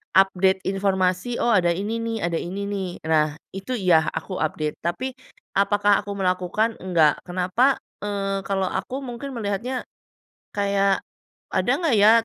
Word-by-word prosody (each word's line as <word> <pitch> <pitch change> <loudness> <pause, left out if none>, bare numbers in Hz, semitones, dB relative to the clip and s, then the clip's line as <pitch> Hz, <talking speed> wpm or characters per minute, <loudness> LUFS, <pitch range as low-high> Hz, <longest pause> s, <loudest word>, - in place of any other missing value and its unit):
Update 190 0 +4
informasi, 190 +3 0
"Oh 240 - +3
ada 180 -5 +4
ini 210 +5 -2
nih, 230 0 -2
ada 170 -1 0
ini 190 +3 -4
nih." 195 -2 -2 0.2
Nah, 155 -2 +2 0.2
itu 195 +6 -4
iya, 175 -7 +4
aku 185 - -5
update. 155 -1 -2
Tapi 245 +11 -2 0.5
apakah 205 0 +4
aku 205 - -6
melakukan? 185 +4 0
Enggak. 165 -5 +3
Kenapa? 185 +9 +2 0.3
Eee, 195 -1 -1
kalau 195 -1 0
aku 265 - -3
mungkin 255 +2 -6
melihatnya 230 +4 -2 0.7
kayak, 200 -1 +2 0.5
ada - - +1
enggak 325 -8 +2
ya 205 +2 +7
195 Hz, 140 wpm, -24 LUFS, 180-215 Hz, 0.7 s, ya